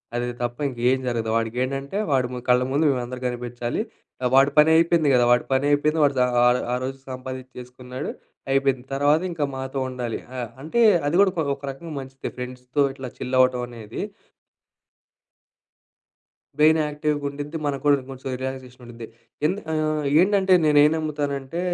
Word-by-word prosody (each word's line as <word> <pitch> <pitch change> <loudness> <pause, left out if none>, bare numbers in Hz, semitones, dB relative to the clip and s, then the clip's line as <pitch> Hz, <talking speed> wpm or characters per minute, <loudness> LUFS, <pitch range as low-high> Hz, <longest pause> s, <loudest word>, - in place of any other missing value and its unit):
అది 120 0 -1 0.2
తప్ప 120 0 -3
ఇంకేం 125 +1 +1
జరగదు. 115 -2 -1
వాడికేంటంటే, 130 - -2
వాడి 130 -2 +2
ము 125 - -4
కళ్ళ 125 0 +5
ముందు 145 +4 +2
మేమందరం 125 -1 -4
గనిపించాలి, 120 - -3 0.4
ఆహ్, 125 - +2
వాడి 135 +1 +5
పని 150 +1 +7
అయిపోయింది 165 -2 +3
గదా! 120 -1 +4
వాడి 120 - +3
పని 135 +1 +2
అయిపోయింది. 150 +2 +2
వాడు 140 - +1
ద 125 - +5 0.5
ఆ - - +2
రోజు 135 +1 -5
సంపాదించేసుకున్నాడు, 130 0 -7 0.4
అయిపోయింది. 135 -2 +1
తర్వాత 145 +3 +3
ఇంక 165 - -6
మాతో 130 +1 -4
ఉండాలి. 125 -3 -4 0.2
ఆ! - - -3 0.2
అంటే 165 +11 0 0.3
అది 150 - 0
కూడా 195 -2 +4 0.2
ఒక 140 - -23
రకంగా, 155 +4 -9
మంచిదే 135 0 -7
ఫ్రెండ్స్‌తో 125 +2 -3
ఇట్లా 130 -2 -7
చిల్ 130 +1 -3
అవ్వటం 125 -1 +3
అనేది. 115 -3 -8 2.6
బ్రెయిన్ 155 +1 +5
యాక్టివ్‌గా 150 0 -2
ఉండిద్ది 145 +3 -6
మనకు 140 -2 -2
కూడా 145 - +6
కొంచెం 135 0 -7
రిలాక్సేషన్ 130 -1 -6
ఉండిద్ది. 115 -1 -9 0.4
ఎందు 190 +6 -1
ఆహ్, 155 -1 0 0.2
ఏంటంటే 190 0 +3
నేనేం 150 0 +5
నమ్ముతానంటే 145 -1 -3
135 Hz, 150 wpm, -23 LUFS, 125-150 Hz, 2.6 s, పని